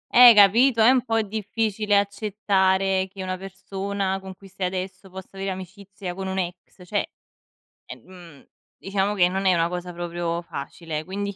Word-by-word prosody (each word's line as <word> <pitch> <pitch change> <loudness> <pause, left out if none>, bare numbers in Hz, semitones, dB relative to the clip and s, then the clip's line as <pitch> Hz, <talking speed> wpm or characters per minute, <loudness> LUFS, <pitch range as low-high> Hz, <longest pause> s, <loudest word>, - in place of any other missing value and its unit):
eh 245 -1 +10
capito, 225 +4 +6
è 235 - +7
un 255 -2 +2
po' 225 -2 0
difficile 210 0 -1
accettare 195 -2 +1
che 195 -1 -7
una 185 0 -3
persona 195 0 -4
con 190 -1 -10
cui 195 - -16
stai 190 -1 -3
adesso 185 0 -6
possa 190 0 -10
avere 195 0 -3
amicizia 190 0 -8
con 190 +1 -5
un 190 0 -3
ex, 180 0 -6
cioè, 205 +3 -2 0.8
ehm, 175 -6 -13 0.3
diciamo 195 +1 -1
che 180 -2 +4
non 190 +1 -2
è 185 - +5
una 170 0 +1
cosa 180 0 -5
proprio 170 0 -3
facile, 155 0 -6
quindi 200 +2 -4
190 Hz, 165 wpm, -24 LUFS, 180-200 Hz, 0.8 s, eh